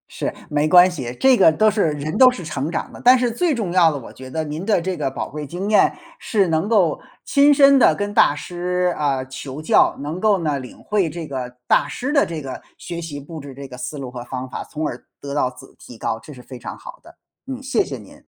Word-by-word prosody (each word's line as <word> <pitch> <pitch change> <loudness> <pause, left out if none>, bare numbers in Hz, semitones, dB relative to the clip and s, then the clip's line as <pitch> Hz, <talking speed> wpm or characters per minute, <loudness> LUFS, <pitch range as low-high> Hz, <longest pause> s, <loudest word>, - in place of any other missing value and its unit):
是， - - -2 0.2
没 150 +1 +1
关 180 +3 +7
系， 125 -7 -6
这 265 -1 +6
个 175 - +6
都 215 +6 +3
是 200 -6 +1
人 150 +2 -4
都 255 - +9
是 230 -8 -6
成 150 -1 -3
长 - - -4
的。 - - -11
但 250 +1 +7
是 245 -1 0
最 320 +5 0
重 210 -7 -3
要 175 -3 +5
的 145 - -4
我 125 - -10
觉 130 0 -11
得 160 +4 -2
您 155 +3 -5
的 210 -2 +2
这 185 +2 -3
个 145 -4 -2
宝 - - -5
贵 150 0 -7
经 190 +7 -4
验 210 - +4 0.2
是 200 -5 +1
能 160 +6 0
够 185 -9 +3 0.3
亲 285 +1 +5
身 275 -1 +6
地 155 - +5
跟 205 +2 -3
大 145 - +4
师， 180 +2 -2
啊， 140 -3 0
求 135 +2 -8
教， 155 - +3
能 155 +5 -4
够 210 -1 +3
呢， 145 -3 0
领 125 - -10
会 200 -6 0
这 165 +1 -6
个 130 -4 -6
大 145 - +3
师 255 - -4
的 285 - +3
这 160 -3 -5
个 130 - -7 0.2
学 170 -1 -6
习 150 -4 -6
布 160 +3 -9
置 140 -2 -10
这 140 0 -8
个 130 - -10
思 130 +4 -6
路 130 -2 -6
和 120 -1 -7
方 130 +1 -5
法， - - -6
从 155 0 -4
而 120 - -7 0.2
得 140 0 -6
到 135 -3 +1
自 130 +1 -15
提 120 - -12
高， 110 0 -3
这 150 - -13
是 125 -3 -12
非 130 -2 -10
常 - - -7
好 - - -11
的。 - - -17 0.3
嗯， 265 0 -6
谢 270 +9 +1
谢 - - -6
您。 - - -15
160 Hz, 270 characters per minute, -21 LUFS, 140-205 Hz, 0.3 s, 都